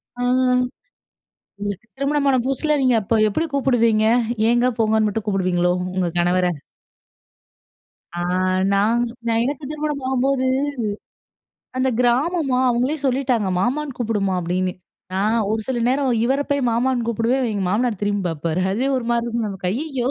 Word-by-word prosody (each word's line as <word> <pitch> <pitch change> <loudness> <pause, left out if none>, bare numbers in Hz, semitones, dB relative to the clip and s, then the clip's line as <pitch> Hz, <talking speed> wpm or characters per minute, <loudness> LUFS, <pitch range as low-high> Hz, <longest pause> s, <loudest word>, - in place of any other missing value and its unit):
அ. 245 - -6 1.4
உங்களுக்கு 205 +1 -5
திருமணமான 275 -1 +1
புதுசுல 270 +3 0
நீங்க 255 -2 +3
அப்போ 215 +3 0
எப்படி 315 +11 -1
கூப்பிடுவீங்க? 230 -5 +2 0.4
ஏங்க, 240 +1 +3
போங்கன்னு 220 -1 +3
மட்டும் 210 +1 -3
கூப்பிடுவீங்களோ? 180 -3 +1 0.2
உங்கள் 180 -3 -1
கணவரை. 180 +1 +2 1.6
ஆ - - -3 0.5
நான் 215 +4 +2 0.4
எனக்கு 280 +3 -3
திருமணம் 300 -2 -3
ஆகும்போது, 265 0 +1 1.3
அந்த 260 +1 +1
கிராமமா 265 +3 +1
அவங்களே 250 +5 0
சொல்லிட்டாங்க, 250 -5 +1
"மாமான்னு 270 +4 -1
கூப்புடுமா." 210 -5 0
அப்படீன்னு. 180 +2 -1 0.4
நான் 210 +4 +1
ஒரு 220 0 0
சில 260 -2 -1
நேரம் 265 +1 +1
இவரை 270 +4 +1
போய் 280 -3 +1
மாமான்னு 240 +1 0
கூப்பிடுவேன். 235 +3 0
எங்க 200 -2 -2
மாமனார் 220 +1 0
திரும்பி 205 -1 0
பார்ப்பாரு. 165 +2 -2
அதுவே 250 +7 0
ஒரு 245 - -5
மாரி 235 0 +1
இருக்கும். 235 -1 -2
நமக்கு 190 -2 -4
ஐயயோ! 265 0 -2
235 Hz, 130 wpm, -21 LUFS, 205-265 Hz, 1.6 s, நீங்க